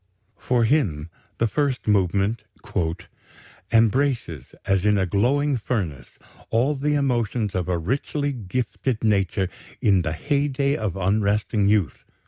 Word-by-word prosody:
For 125 -2 +1
him 90 - +1 0.3
the 115 - +2
first 135 +3 -1
movement 100 +2 +2 1.3
"embraces, 115 - +1
as 95 -2 +1
in 105 0 +3
a 95 - +2
glowing 130 +9 +1
furnace, 90 - -4 0.3
all 125 +6 +2
the 150 +1 0
emotions 120 -6 0
of 90 -1 -2
a 90 - +1
richly 140 - -2
gifted 120 +2 -3
nature 100 -3 +1 0.3
in 100 -3 +3
the 80 -2 -2
heyday 140 - 0
of 105 - -3
unresting 100 +2 +1
youth 105 -4 +1
110 Hz, 120 wpm, -23 LUFS, 95-130 Hz, 1.3 s, in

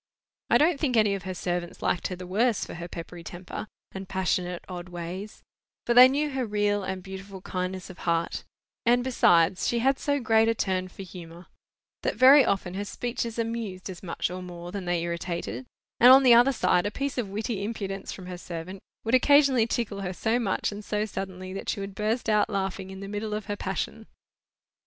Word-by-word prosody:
I - - +6
don't 310 -1 +3
think 255 -6 +1
any 210 -2 +4
of 195 -2 -5
her 185 - -3
servants 175 -1 -3
liked 175 - 0
her 185 - -5
the 180 0 -8
worse 215 +5 +1
for - - -8
her 170 0 -6
peppery 170 0 -8
temper, 180 +5 -7 0.2
and 190 0 -8
passionate 185 -2 -1
odd 180 -1 -7
ways, 175 +4 -7 0.4
for 240 - +2
they 250 +1 +10
knew 290 +3 0
her 265 -1 -1
real 205 -2 0
and 190 -1 -4
beautiful 190 0 -8
kindness 185 0 -4
of 185 - -15
heart: 170 -1 -1 0.4
and, 245 0 +3
besides, 180 -8 +3
she 240 - +1
had 270 +3 +2
so 285 0 0
great 225 -2 +3
a 230 - +1
turn 185 -3 -1
for 190 +1 -10
humour 175 -1 -11 0.6
that - - -1
very 265 +4 +8
often 190 -5 -1
her 200 +2 -3
speeches 235 +2 -4
amused 225 -5 -3
as 180 - -10
much 175 -1 -3
or 185 0 -5
more 175 -1 -8
than 195 -1 -5
they 175 -1 0
irritated; 170 +8 -4 0.3
and 245 +2 +9
on 270 +1 +8
the 250 -2 +8
other 240 +3 +6
side, 185 -5 +2
a - - 0
piece 275 +2 -3
of 215 -5 -2
witty 205 0 -3
impudence 195 -3 -4
from 185 - -8
her 180 -1 -7
servant 180 +2 -7 0.2
would 225 - -2
occasionally 265 -3 +5
tickle 220 -4 -2
her 185 -1 -3
so 225 +6 0
much 215 -3 -1
and 205 +1 -7
so 210 +1 -1
suddenly, 185 -2 -6
that 195 - -5
she - - -1
would 195 0 -5
burst 215 +5 -1
out 210 0 +3
laughing 195 -2 -3
in 190 0 -8
the 195 - -6
middle 210 +1 -3
of 210 -1 -5
her 205 - -3
passion. 205 +3 -4
195 Hz, 210 wpm, -27 LUFS, 180-230 Hz, 0.6 s, they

